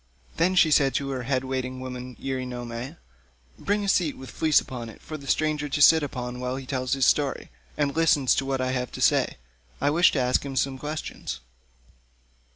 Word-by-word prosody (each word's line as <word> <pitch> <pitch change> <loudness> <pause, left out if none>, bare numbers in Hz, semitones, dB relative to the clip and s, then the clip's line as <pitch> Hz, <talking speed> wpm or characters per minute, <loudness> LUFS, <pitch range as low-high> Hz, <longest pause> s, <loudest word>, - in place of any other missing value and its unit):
Then 180 +3 +2
she 165 -3 +5
said 135 -2 +4
to 140 -1 -1
her 130 -2 -3
head 130 -1 +1
waiting 130 -1 -3
woman 125 -1 -7
Eurynome, 125 0 -5 0.6
"Bring 205 +1 0
a - - -2
seat 175 -6 +1
with 130 - -10
a - - -17
fleece 155 -2 +4
upon 120 -3 -7
it, 110 - -13
for 155 - -8
the 140 -2 -9
stranger 150 -1 0
to 140 - -1
sit 160 +2 +7
upon 125 -3 -5
while 125 0 -2
he 135 0 -6
tells 130 -1 -2
his 135 -2 +2
story, 145 - +1 0.3
and 145 -2 0
listens 160 -5 +4
to 135 - 0
what 135 -1 -1
I 130 0 0
have 125 -1 -2
to - - -7
say. - - +2 0.4
I 145 - +2
wish 175 +4 +5
to 145 - +1
ask 125 0 +2
him 140 -1 -6
some 130 0 0
questions." 150 - -5
135 Hz, 205 wpm, -26 LUFS, 125-150 Hz, 0.6 s, sit